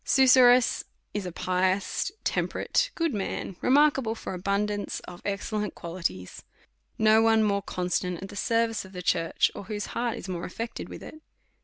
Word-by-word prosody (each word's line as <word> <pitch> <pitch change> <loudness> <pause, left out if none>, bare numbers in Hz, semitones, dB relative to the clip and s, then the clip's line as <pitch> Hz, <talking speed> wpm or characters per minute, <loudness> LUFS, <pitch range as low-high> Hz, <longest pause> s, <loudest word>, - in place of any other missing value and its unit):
Susurrus 255 -2 +5 0.3
is 205 -3 -3
a - - -5
pious, 185 - 0
temperate, - - 0
good 330 -4 0
man, 195 -2 -3
remark 290 +2 +4
able 225 -3 -2
for 220 - -6
abundance 200 +2 -1
of 175 0 -11
excellent 210 +1 -3
qualities. 165 - -5 0.5
No 220 0 +5
one 225 -1 +4
more 200 -1 +1
constant 180 -1 -2
at 195 - -8
the 205 - -10
service 230 0 0
of 190 0 -14
the 180 -1 -6
church, 165 -1 +2
or - - -8
whose 205 0 -4
heart 235 -1 -1
is - - -8
more 175 -2 -4
affected 230 +5 -6
with - - -9
it. 310 - -11
205 Hz, 165 wpm, -27 LUFS, 185-230 Hz, 0.5 s, Susurrus